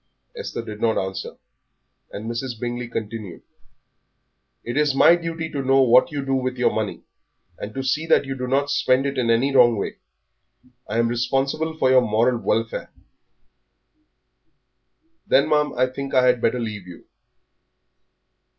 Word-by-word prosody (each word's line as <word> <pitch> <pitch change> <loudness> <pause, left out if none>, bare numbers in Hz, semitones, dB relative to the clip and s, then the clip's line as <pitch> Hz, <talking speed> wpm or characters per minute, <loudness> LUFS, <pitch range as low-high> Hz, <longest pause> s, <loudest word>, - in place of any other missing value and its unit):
Esther - - -5
did 105 0 -8
not 115 -1 +1
answer, 95 0 -4 0.7
and 105 - -7
Mrs. 120 0 -4
Bingley 120 0 -4
continued 110 -4 -6 1.2
"It 120 - -5
is 145 -1 +2
my 170 - +6
duty 165 -1 -4
to 140 - -3
know 135 0 +4
what 125 +5 +4
you 140 -2 -4
do 135 - -1
with 130 -1 -1
your 125 - +2
money, 110 -2 -3 0.6
and 105 - -6
to 135 - -3
see 150 +5 -1
that 145 - +3
you 135 0 -4
do 125 -1 -4
not 140 +2 0
spend 130 -1 +2
it 140 -1 -2
in 120 -2 0
any 130 +4 +2
wrong 120 -3 +5
way. 100 - -4 0.9
I 110 - -2
am 115 0 +2
responsible 135 +7 -1
for 130 -4 +2
your 130 -1 +6
moral 115 +2 +1
welfare." 115 0 -2 2.4
"Then, 140 - +4
ma'am, 150 -1 +2
I 130 - +4
think 135 +2 -5
I 130 -1 +5
had 125 -1 +3
better 125 +2 +1
leave 105 -5 -5
you." 90 - -12
125 Hz, 160 wpm, -22 LUFS, 115-135 Hz, 2.4 s, my